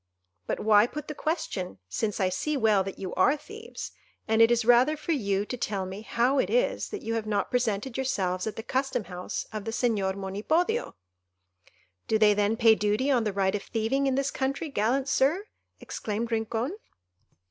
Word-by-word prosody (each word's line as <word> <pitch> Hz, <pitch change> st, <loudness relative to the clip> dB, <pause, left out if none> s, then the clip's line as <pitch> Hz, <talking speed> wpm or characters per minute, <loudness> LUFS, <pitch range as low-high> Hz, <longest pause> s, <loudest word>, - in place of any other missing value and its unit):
But -, -, -1 dB
why 210 Hz, +1 st, +5 dB
put 300 Hz, +3 st, -7 dB
the 300 Hz, -, -4 dB
question, 275 Hz, -, -3 dB
since 210 Hz, -, -2 dB
I 190 Hz, -2 st, +2 dB
see 285 Hz, +11 st, -1 dB
well 215 Hz, -5 st, +3 dB
that 195 Hz, 0 st, -6 dB
you 185 Hz, -2 st, -5 dB
are 265 Hz, +11 st, +3 dB
thieves; 440 Hz, +8 st, -9 dB, 0.4 s
and 220 Hz, 0 st, +3 dB
it 225 Hz, -, +7 dB
is 240 Hz, -1 st, +2 dB
rather 245 Hz, +6 st, +5 dB
for 310 Hz, -, -3 dB
you 200 Hz, -8 st, 0 dB
to 250 Hz, -, -4 dB
tell 200 Hz, -5 st, -2 dB
me 190 Hz, +2 st, -7 dB
how 245 Hz, +5 st, +1 dB
it -, -, +1 dB
is -, -, +1 dB
that 415 Hz, -, -6 dB
you 225 Hz, -, -2 dB
have 225 Hz, -1 st, -2 dB
not 205 Hz, -2 st, -1 dB
presented 240 Hz, 0 st, 0 dB
yourselves 190 Hz, -8 st, -1 dB
at 215 Hz, -, -3 dB
the 225 Hz, -, -6 dB
custom 265 Hz, -2 st, -1 dB
house 180 Hz, -1 st, -5 dB
of 215 Hz, -1 st, -4 dB
the 225 Hz, -, -4 dB
Señor 220 Hz, -5 st, 0 dB
Monipodio." 265 Hz, -, -1 dB, 1.1 s
"Do 220 Hz, -, +3 dB
they 215 Hz, -1 st, +5 dB
then 205 Hz, +2 st, +1 dB
pay 225 Hz, -1 st, +6 dB
duty 215 Hz, +6 st, +1 dB
on 240 Hz, -4 st, +2 dB
the 210 Hz, -, 0 dB
right 195 Hz, -1 st, +1 dB
of 205 Hz, -, -1 dB
thieving 240 Hz, +7 st, 0 dB
in 265 Hz, -, +1 dB
this 275 Hz, 0 st, 0 dB
country, 275 Hz, +4 st, -2 dB
gallant 260 Hz, +2 st, 0 dB
Sir?" 290 Hz, +9 st, +2 dB, 0.3 s
exclaimed 225 Hz, +2 st, -4 dB
Rincon. 225 Hz, -, -1 dB
225 Hz, 190 wpm, -27 LUFS, 205-270 Hz, 1.1 s, it